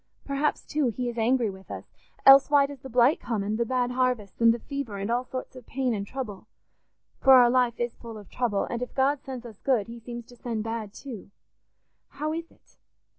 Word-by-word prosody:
Perhaps, 280 Hz, +2 st, -1 dB
too, 295 Hz, -3 st, 0 dB
he 245 Hz, +2 st, -3 dB
is 240 Hz, -, -7 dB
angry 235 Hz, -1 st, +2 dB
with 190 Hz, 0 st, -14 dB
us; -, -, -7 dB, 0.4 s
else 270 Hz, +1 st, +9 dB
why 285 Hz, -1 st, +5 dB
does 280 Hz, -1 st, -8 dB
the 265 Hz, -, -10 dB
blight 245 Hz, +4 st, +4 dB
come, 225 Hz, -4 st, -2 dB
and 215 Hz, +3 st, -2 dB
the 235 Hz, -, 0 dB
bad 250 Hz, 0 st, 0 dB
harvests, 250 Hz, -5 st, -1 dB
and 230 Hz, 0 st, +7 dB
the 230 Hz, -, 0 dB
fever, 260 Hz, -4 st, -5 dB
and 200 Hz, +3 st, -3 dB
all 245 Hz, +1 st, +1 dB
sorts 255 Hz, +1 st, -7 dB
of 255 Hz, -2 st, -12 dB
pain 260 Hz, -2 st, -1 dB
and 200 Hz, -2 st, -3 dB
trouble? 245 Hz, -7 st, -6 dB, 0.7 s
For 270 Hz, -, +7 dB
our 245 Hz, -1 st, +7 dB
life 245 Hz, -2 st, +2 dB
is 240 Hz, -1 st, -1 dB
full 230 Hz, -2 st, -9 dB
of 205 Hz, -2 st, -12 dB
trouble, 230 Hz, -5 st, -1 dB
and 235 Hz, -, -4 dB
if 250 Hz, -, -5 dB
God 275 Hz, +1 st, +2 dB
sends 255 Hz, -3 st, -7 dB
us 220 Hz, -4 st, -11 dB
good, 250 Hz, -7 st, +1 dB
he 235 Hz, +2 st, -9 dB
seems 235 Hz, 0 st, -8 dB
to 245 Hz, -, -16 dB
send 230 Hz, -2 st, -4 dB
bad 225 Hz, -2 st, -4 dB
too. 230 Hz, -4 st, -9 dB, 0.8 s
How 305 Hz, +1 st, -4 dB
is 330 Hz, +1 st, -5 dB
it? -, -, -28 dB
245 Hz, 225 wpm, -27 LUFS, 225-265 Hz, 0.8 s, else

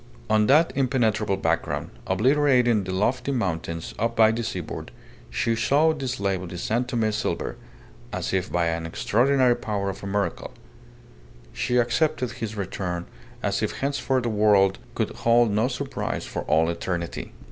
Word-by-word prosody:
On 110 Hz, -1 st, +4 dB
that 155 Hz, +5 st, +5 dB
impenetrable 115 Hz, -7 st, +1 dB
background, 85 Hz, -3 st, -1 dB, 0.2 s
obliterating 125 Hz, -4 st, +3 dB
the 95 Hz, -, -4 dB
lofty 120 Hz, +9 st, 0 dB
mountains 85 Hz, -8 st, -2 dB, 0.2 s
by 110 Hz, -1 st, +6 dB
the 115 Hz, +1 st, -2 dB
seaboard, 90 Hz, -7 st, -5 dB, 0.4 s
she 115 Hz, -, 0 dB
saw 145 Hz, +7 st, +3 dB
the 140 Hz, -4 st, -4 dB
slave 100 Hz, -7 st, -1 dB
of 90 Hz, -, -7 dB
the 90 Hz, -, -7 dB
San 115 Hz, +7 st, 0 dB
Tome 115 Hz, -3 st, 0 dB
silver, 105 Hz, -, -2 dB, 0.6 s
as -, -, -3 dB
if 95 Hz, -1 st, -1 dB
by 85 Hz, -1 st, +1 dB
an 85 Hz, 0 st, -1 dB
extraordinary 125 Hz, +8 st, +3 dB
power 100 Hz, -4 st, -2 dB
of 95 Hz, -, -11 dB
a -, -, -4 dB
miracle. 100 Hz, 0 st, -2 dB, 1.0 s
She 125 Hz, -, 0 dB
accepted 125 Hz, +1 st, +1 dB
his 110 Hz, -1 st, -5 dB
return 90 Hz, -3 st, -3 dB, 0.4 s
as -, -, 0 dB
if -, -, -1 dB
henceforth 135 Hz, -2 st, -1 dB
the 120 Hz, -, 0 dB
world 105 Hz, -3 st, +3 dB, 0.2 s
could -, -, -1 dB
hold 115 Hz, -1 st, +4 dB
no 110 Hz, +4 st, +2 dB
surprise 135 Hz, +1 st, -3 dB
for -, -, -4 dB
all 80 Hz, +1 st, +3 dB
eternity. 85 Hz, 0 st, -4 dB
110 Hz, 155 wpm, -25 LUFS, 95-125 Hz, 1.0 s, by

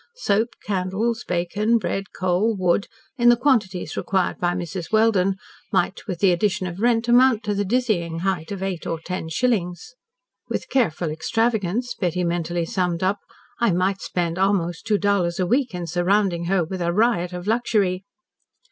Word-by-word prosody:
Soap, 225 Hz, -, 0 dB
candles, 205 Hz, +4 st, -1 dB
bacon, 205 Hz, +6 st, +1 dB
bread, 195 Hz, -1 st, -2 dB
coal, 185 Hz, +4 st, +1 dB
wood, 185 Hz, +1 st, +1 dB, 0.3 s
in 240 Hz, 0 st, +6 dB
the 240 Hz, -, +6 dB
quantities 225 Hz, -9 st, +1 dB
required 190 Hz, -2 st, -1 dB
by 175 Hz, 0 st, 0 dB
Mrs. 175 Hz, -1 st, -5 dB
Welden, 215 Hz, -4 st, +3 dB, 0.4 s
might, -, -, 0 dB
with 180 Hz, -4 st, -4 dB
the 195 Hz, -2 st, +5 dB
addition 185 Hz, +1 st, 0 dB
of 180 Hz, 0 st, -6 dB
rent, 235 Hz, 0 st, +2 dB
amount 245 Hz, -1 st, +5 dB
to 210 Hz, -1 st, -1 dB
the 200 Hz, 0 st, 0 dB
dizzying 190 Hz, -7 st, 0 dB
height 180 Hz, -3 st, -2 dB
of 195 Hz, -1 st, -4 dB
eight 190 Hz, -3 st, -3 dB
or 165 Hz, -, -2 dB
ten 175 Hz, 0 st, -5 dB
shillings. 180 Hz, 0 st, -1 dB, 0.6 s
"With -, -, -3 dB
careful 175 Hz, -, +1 dB
extravagance," 225 Hz, +6 st, 0 dB
Betty 180 Hz, -1 st, -1 dB
mentally 170 Hz, 0 st, -1 dB
summed 180 Hz, 0 st, -1 dB
up, 200 Hz, +2 st, +1 dB, 0.4 s
"I 235 Hz, -5 st, +3 dB
might 190 Hz, +2 st, 0 dB
spend 175 Hz, 0 st, -2 dB
almost 185 Hz, -4 st, 0 dB
two 210 Hz, -, +3 dB
dollars 195 Hz, -4 st, +1 dB
a 185 Hz, -, +2 dB
week 245 Hz, +1 st, +1 dB
in 175 Hz, -1 st, -4 dB
surrounding 175 Hz, +1 st, +1 dB
her 185 Hz, 0 st, +2 dB
with 185 Hz, +2 st, -5 dB
a 170 Hz, 0 st, +1 dB
riot 190 Hz, -3 st, +2 dB
of 180 Hz, 0 st, -6 dB
luxury." 205 Hz, -4 st, +1 dB
190 Hz, 165 wpm, -23 LUFS, 175-220 Hz, 0.6 s, in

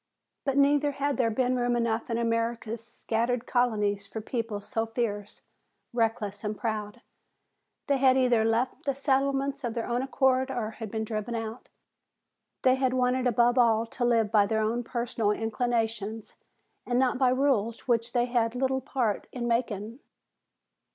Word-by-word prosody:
But 275 Hz, -1 st, 0 dB
neither 285 Hz, +1 st, +3 dB
had 280 Hz, 0 st, -1 dB
there 240 Hz, -3 st, +2 dB
been 250 Hz, +3 st, +1 dB
room 245 Hz, 0 st, +1 dB
enough 230 Hz, -1 st, -1 dB
in 230 Hz, -, 0 dB
America's 230 Hz, -1 st, -1 dB
scattered 235 Hz, +1 st, -2 dB
colonies 210 Hz, -5 st, +1 dB
for 220 Hz, -, -6 dB
people 225 Hz, -1 st, -3 dB
so 225 Hz, +2 st, -2 dB
fierce, 210 Hz, -3 st, -3 dB, 0.5 s
reckless 220 Hz, -3 st, -1 dB
and 210 Hz, 0 st, -3 dB
proud. 215 Hz, -2 st, -3 dB, 0.8 s
They 280 Hz, -2 st, +2 dB
had 265 Hz, -1 st, +4 dB
either 245 Hz, -4 st, +3 dB
left 225 Hz, +3 st, 0 dB
the 275 Hz, -2 st, 0 dB
settlements 275 Hz, 0 st, 0 dB
of 235 Hz, -1 st, -3 dB
their 230 Hz, -, -2 dB
own 240 Hz, +1 st, -1 dB
accord 265 Hz, -1 st, +2 dB
or 225 Hz, -4 st, -3 dB
been 220 Hz, +1 st, -2 dB
driven 220 Hz, +1 st, -3 dB
out. 225 Hz, +1 st, -6 dB, 0.9 s
They 255 Hz, -, +6 dB
had 260 Hz, -1 st, +1 dB
wanted 255 Hz, 0 st, +2 dB
above 240 Hz, +1 st, +3 dB
all 230 Hz, -2 st, +4 dB
to 245 Hz, +2 st, -5 dB
live 230 Hz, -3 st, +2 dB
by 205 Hz, -2 st, +4 dB
their 220 Hz, +1 st, +1 dB
own 235 Hz, +3 st, 0 dB
personal 235 Hz, -2 st, -1 dB
inclinations 225 Hz, -1 st, -2 dB, 0.5 s
and 245 Hz, -, -1 dB
not 255 Hz, 0 st, +2 dB
by 260 Hz, -2 st, +4 dB
rules 250 Hz, -4 st, +1 dB
which 235 Hz, -1 st, +1 dB
they 240 Hz, -1 st, +2 dB
had 240 Hz, -1 st, 0 dB
little 265 Hz, +1 st, 0 dB
part 245 Hz, -5 st, -1 dB
in 240 Hz, -2 st, -3 dB
making. 230 Hz, -1 st, -1 dB
235 Hz, 160 wpm, -28 LUFS, 225-255 Hz, 0.9 s, They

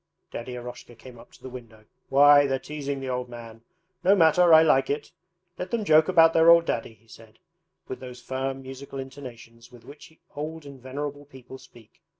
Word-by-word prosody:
Daddy 125 Hz, +1 st, -7 dB
Eroshka 120 Hz, 0 st, -10 dB
came 120 Hz, +1 st, -14 dB
up 115 Hz, -, -17 dB
to -, -, -20 dB
the -, -, -7 dB
window. 115 Hz, -4 st, -13 dB, 0.2 s
'Why, 145 Hz, +1 st, +6 dB
they're 135 Hz, -1 st, -1 dB
teasing 140 Hz, -1 st, -6 dB
the 135 Hz, -, -5 dB
old 125 Hz, 0 st, -4 dB
man. 115 Hz, -2 st, -11 dB, 0.4 s
No 195 Hz, +3 st, +5 dB
matter, 170 Hz, 0 st, +4 dB
I 160 Hz, 0 st, +8 dB
like 135 Hz, -4 st, +2 dB
it. 145 Hz, +1 st, -4 dB, 0.5 s
Let 180 Hz, -, -5 dB
them 225 Hz, -1 st, -2 dB
joke 155 Hz, -3 st, +4 dB
about 165 Hz, -3 st, +5 dB
their 165 Hz, +1 st, +5 dB
old 170 Hz, 0 st, +6 dB
daddy,' 115 Hz, -4 st, -4 dB
he 115 Hz, +2 st, -31 dB
said 110 Hz, 0 st, -17 dB, 0.5 s
with 130 Hz, -, -7 dB
those 125 Hz, -1 st, -10 dB
firm 135 Hz, +1 st, -5 dB
musical 135 Hz, +1 st, -10 dB
intonations 125 Hz, -3 st, -11 dB
with 120 Hz, -2 st, -17 dB
which 145 Hz, +3 st, -14 dB, 0.2 s
old 155 Hz, +1 st, -6 dB
and 140 Hz, -2 st, -12 dB
venerable 145 Hz, +2 st, -6 dB
people 130 Hz, -1 st, -13 dB
speak. 115 Hz, -4 st, -20 dB
135 Hz, 190 wpm, -25 LUFS, 125-150 Hz, 0.5 s, I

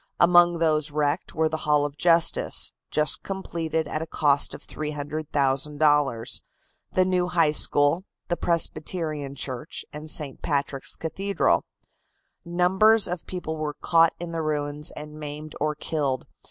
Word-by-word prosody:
Among 175 Hz, 0 st, +6 dB
those 155 Hz, -2 st, +1 dB
wrecked 145 Hz, -1 st, -1 dB
were 160 Hz, +1 st, +2 dB
the 160 Hz, 0 st, -2 dB
Hall 150 Hz, -2 st, +2 dB
of 145 Hz, -1 st, -5 dB
justice, 170 Hz, +1 st, +2 dB, 0.2 s
just 150 Hz, 0 st, +1 dB
completed 165 Hz, -5 st, -3 dB
at 155 Hz, -, -3 dB
a 160 Hz, -, -4 dB
cost 145 Hz, -3 st, +2 dB
of -, -, -12 dB
$300,000; 145 Hz, -3 st, 0 dB, 0.5 s
the 185 Hz, -, +3 dB
new 180 Hz, -1 st, +1 dB
High 170 Hz, -4 st, +3 dB
School, 150 Hz, +4 st, +2 dB, 0.2 s
the 175 Hz, -, 0 dB
Presbyterian 155 Hz, -4 st, -1 dB
Church 130 Hz, -3 st, -4 dB
and 150 Hz, +1 st, -7 dB
St. 145 Hz, -3 st, 0 dB
Patrick's 140 Hz, -2 st, -1 dB
Cathedral. 195 Hz, +5 st, 0 dB, 0.8 s
Numbers 190 Hz, +5 st, +3 dB
of 180 Hz, -2 st, -5 dB
people 165 Hz, -4 st, -5 dB
were 150 Hz, -1 st, -3 dB
caught 165 Hz, -1 st, +3 dB
in 175 Hz, -1 st, -5 dB
the 165 Hz, -1 st, -2 dB
ruins 150 Hz, -1 st, -2 dB
and 150 Hz, 0 st, -9 dB
maimed 150 Hz, 0 st, -7 dB
or 150 Hz, 0 st, 0 dB
killed. 145 Hz, -4 st, -1 dB
155 Hz, 140 wpm, -25 LUFS, 145-170 Hz, 0.8 s, Among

